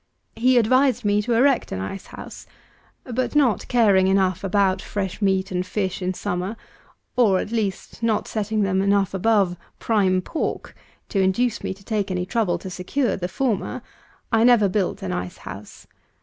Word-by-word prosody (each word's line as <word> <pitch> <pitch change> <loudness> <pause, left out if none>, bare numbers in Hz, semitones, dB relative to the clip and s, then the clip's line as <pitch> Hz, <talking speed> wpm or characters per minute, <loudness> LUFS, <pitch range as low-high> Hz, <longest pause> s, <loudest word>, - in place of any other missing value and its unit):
He 250 +3 +3
advised 250 +1 +3
me 205 0 +3
to 235 +3 -1
erect 265 +2 +3
an 95 - -3
ice 140 - -6
house; - - -10 0.6
but 255 +3 -3
not 260 -9 +2
caring 205 -6 +4
enough 190 -2 +1
about 195 -1 +2
fresh 195 -1 -4
meat 190 -1 +1
and 180 0 -1
fish 190 0 -3
in 185 0 -2
summer, 180 +5 -3 0.6
or 215 -7 +4
at 205 - -3
least 220 -1 -3
not 225 -2 0
setting 215 0 -1
them 190 -1 +1
enough 200 -1 +2
above 195 -2 +2 0.2
"prime 195 -5 +2
pork" 325 - -4 0.3
to 195 - +1
induce 210 +6 +1
me - - -2
to 195 - -19
take 205 -2 -2
any 180 -1 -2
trouble 215 -3 0
to 190 - -8
secure 205 +7 -1
the 180 - -3
former, 230 +3 -2 0.5
I 225 -1 +4
never 235 -4 +5
built 190 -1 -1
an 90 - -3
ice 90 0 -4
house. 95 +2 -10
200 Hz, 170 wpm, -23 LUFS, 185-230 Hz, 0.6 s, never